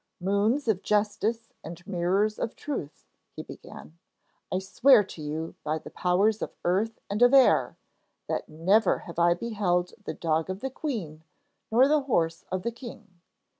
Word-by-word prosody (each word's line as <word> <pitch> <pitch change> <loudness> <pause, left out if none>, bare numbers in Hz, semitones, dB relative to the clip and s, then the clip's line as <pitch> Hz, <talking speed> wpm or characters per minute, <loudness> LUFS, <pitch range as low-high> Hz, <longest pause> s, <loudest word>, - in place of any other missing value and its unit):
'Moons 205 +9 +1
of 205 -4 +1
justice 215 +2 -1
and 170 +2 -9
mirrors 195 +3 0
of 225 - -3
truth,' 265 - -6 0.3
he - - -6
began. 80 +3 -12 0.5
'I - - +1
swear 210 +5 +5
to 170 - -11
you 155 +2 -4
by 155 +1 -1
the - - -11
powers 200 +5 +1
of - - -5
earth 200 +6 0
and 205 +3 -3
of 245 +2 +6
air 270 - +4 0.5
that - - -3
never 185 +8 +2
have 170 0 -6
I 170 0 +4
beheld 180 -4 -1
the - - -4
dog 160 0 -1
of 190 +2 -5
the 265 - -3
queen 195 - -5 0.5
nor 250 +4 +5
the 300 0 +3
horse 165 -11 -1
of 185 -1 -2
the 235 - -1
king. 230 -7 -12
195 Hz, 165 wpm, -27 LUFS, 170-225 Hz, 0.5 s, of